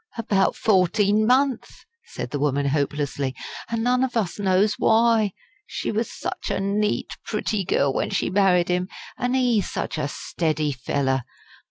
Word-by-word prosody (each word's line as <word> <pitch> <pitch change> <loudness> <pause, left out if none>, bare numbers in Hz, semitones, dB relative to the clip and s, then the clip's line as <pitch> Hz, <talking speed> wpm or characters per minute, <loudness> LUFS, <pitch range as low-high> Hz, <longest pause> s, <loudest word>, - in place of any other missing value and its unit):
"About 200 -4 +1
fourteen 205 +2 +2
month," 260 0 +1 0.2
said - - -7
the 145 - -2
woman, 140 -1 +1
hopelessly. 140 -2 -1 0.3
"An' 230 -1 -1
none 250 +1 +2
of 250 -2 -1
us 205 -3 -2
knows 200 +2 +3
why. 225 -2 +3 0.4
She - - -3
was 220 +1 -2
such - - -5
a - - -1
neat, 205 +2 -1
pretty 215 -1 -2
girl 140 -5 +1
when - - -1
she - - -1
married 185 -3 +3
'im 180 +1 0 0.3
an' 250 +1 -1
ee 245 -5 +3
such 165 - -4
a 145 - -1
steady 155 0 -2
fellow. 130 +1 -1
195 Hz, 155 wpm, -23 LUFS, 150-225 Hz, 0.4 s, knows